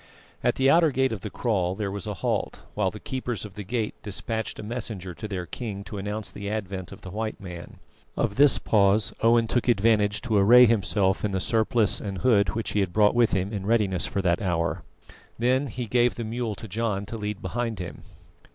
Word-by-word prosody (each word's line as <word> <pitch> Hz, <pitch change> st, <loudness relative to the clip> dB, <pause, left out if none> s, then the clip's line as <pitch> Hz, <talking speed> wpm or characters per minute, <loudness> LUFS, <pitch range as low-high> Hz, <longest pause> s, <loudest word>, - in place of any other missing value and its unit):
At -, -, +2 dB
the 135 Hz, -, +2 dB
outer 165 Hz, +3 st, +5 dB
gate 130 Hz, -1 st, +1 dB
of 110 Hz, -, -4 dB
the -, -, -5 dB
kraal 95 Hz, -6 st, -1 dB
there 100 Hz, -1 st, -3 dB
was 100 Hz, +1 st, -6 dB
a 105 Hz, -, -3 dB
halt, 90 Hz, -, -2 dB
while -, -, +1 dB
the -, -, -10 dB
keepers 125 Hz, -4 st, -4 dB
of 105 Hz, -, -10 dB
the 105 Hz, -, -7 dB
gate 110 Hz, +1 st, -2 dB
despatched 110 Hz, +2 st, -4 dB
a -, -, -7 dB
messenger 105 Hz, -5 st, -5 dB
to 110 Hz, -, -7 dB
their 95 Hz, -4 st, -4 dB
king 100 Hz, 0 st, -6 dB
to 100 Hz, 0 st, -7 dB
announce 105 Hz, +2 st, -4 dB
the 100 Hz, 0 st, -6 dB
advent 95 Hz, -4 st, -4 dB
of 100 Hz, -, -11 dB
the 95 Hz, -, -9 dB
white 110 Hz, +2 st, -4 dB
man. 90 Hz, -3 st, -9 dB, 0.4 s
Of 100 Hz, -, 0 dB
this 140 Hz, +1 st, +6 dB
pause 105 Hz, 0 st, +3 dB
Owen 115 Hz, 0 st, +4 dB
took 120 Hz, +2 st, -1 dB
advantage 105 Hz, -2 st, +3 dB
to 110 Hz, -4 st, +1 dB
array 120 Hz, +5 st, +8 dB
himself 100 Hz, -3 st, +1 dB
in 105 Hz, -2 st, -1 dB
the 95 Hz, -, 0 dB
surplice 110 Hz, +1 st, +2 dB
and 100 Hz, -2 st, -4 dB
hood 100 Hz, -6 st, +2 dB
which 115 Hz, -, -2 dB
he 105 Hz, -, 0 dB
had 95 Hz, -3 st, -1 dB
brought 105 Hz, -1 st, +4 dB
with 120 Hz, -2 st, +3 dB
him 95 Hz, +2 st, -1 dB
in 100 Hz, -1 st, -4 dB
readiness 105 Hz, -6 st, +2 dB
for 100 Hz, -, -2 dB
that 85 Hz, -2 st, +1 dB
hour. 85 Hz, -4 st, -1 dB, 0.6 s
Then 130 Hz, +4 st, +2 dB
he 125 Hz, +1 st, -5 dB
gave 120 Hz, +2 st, +2 dB
the 120 Hz, -, -4 dB
mule 115 Hz, -1 st, -3 dB
to 110 Hz, -, -9 dB
John 105 Hz, -1 st, -2 dB
to 105 Hz, -, -7 dB
lead 105 Hz, -2 st, -4 dB
behind 115 Hz, +3 st, -3 dB
him. 90 Hz, -2 st, -7 dB
105 Hz, 215 wpm, -26 LUFS, 95-115 Hz, 0.6 s, array